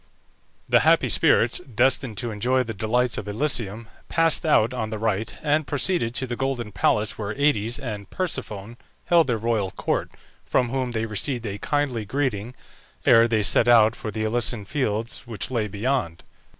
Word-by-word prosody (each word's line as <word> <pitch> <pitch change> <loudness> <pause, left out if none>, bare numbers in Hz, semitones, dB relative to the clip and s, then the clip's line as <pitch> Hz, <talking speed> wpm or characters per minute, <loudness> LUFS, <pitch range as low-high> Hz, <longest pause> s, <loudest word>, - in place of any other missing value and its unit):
The - - +5
happy - - +3
spirits, 115 0 +3
destined 125 -2 0
to 120 -2 -2
enjoy 125 +5 +1
the 115 -2 -6
delights 115 +4 0
of 105 - -8
Elysium, 110 -2 -1 0.2
passed 165 0 +2
out 120 -5 +3
on 110 -3 -3
the 110 - -4
right, 110 0 -1
and 150 0 +1
proceeded 145 -5 +1
to 130 - +1
the 120 -1 -4
golden 125 -4 -3
palace 105 +2 0
where 105 0 -4
Aïdes 125 -5 +1
and 110 -8 -6
Persephone 115 - -4 0.3
held 170 -3 +4
their 120 -3 0
royal 110 -3 -1
court, - - -2 0.3
from 125 -2 0
whom 130 0 -2
they 110 0 -1
received 115 +3 -1
a 100 -1 -5
kindly 145 -6 -1
greeting, 120 -1 -2 0.5
ere 115 0 +6
they 110 -2 +1
set 105 +4 +3
out 115 -2 +6
for 110 - -6
the 110 0 -3
Elysian 110 -1 0
Fields 115 -3 -3
which 115 +1 -5
lay 115 -4 0
beyond. 105 -4 -2
115 Hz, 170 wpm, -24 LUFS, 110-130 Hz, 0.5 s, ere